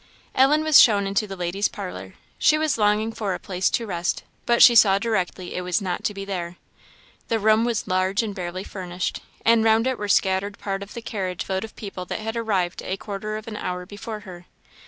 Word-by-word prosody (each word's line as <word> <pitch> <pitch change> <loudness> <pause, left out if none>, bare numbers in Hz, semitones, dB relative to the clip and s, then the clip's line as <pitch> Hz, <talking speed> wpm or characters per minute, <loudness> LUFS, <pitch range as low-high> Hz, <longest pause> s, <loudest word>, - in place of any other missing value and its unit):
Ellen 290 +4 +4
was 310 -2 +8
shown 205 -4 +4
into 200 +2 0
the 195 - -6
ladies' 180 +3 -1
parlour. 95 +1 -8 0.2
She 305 - +4
was 310 -6 0
longing 210 +1 +2
for 205 -4 -2
a - - -7
place 185 0 -1
to 235 - -1
rest, 175 -4 -2 0.2
but 235 0 +6
she 240 - +9
saw 200 -4 +6
directly 195 -4 -2
it 180 - -3
was 180 +1 0
not 185 -3 -3
to 210 - -1
be 195 0 -5
there. 180 -3 -4 0.7
The 230 - +1
room 220 +1 +3
was 235 -3 -1
large 185 +3 +1
and 210 -2 -4
barely 185 -1 -5
furnished; 180 -3 -4 0.2
and 230 -1 +5
round 225 +1 +4
it 260 -1 -1
were 205 - -3
scattered 195 +1 +1
part 195 -1 -4
of 200 +1 -9
the 235 - -6
carriage 185 -5 -4
load 190 +1 -1
of 220 - -9
people 195 -3 -7
that - - -4
had 220 +1 -4
arrived 195 -6 -1
a 190 - -3
quarter 210 +1 -5
of 215 - -10
an 215 -2 -6
hour 180 -2 -4
before 210 +2 -7
her. 180 -3 -11
200 Hz, 220 wpm, -24 LUFS, 185-220 Hz, 0.7 s, she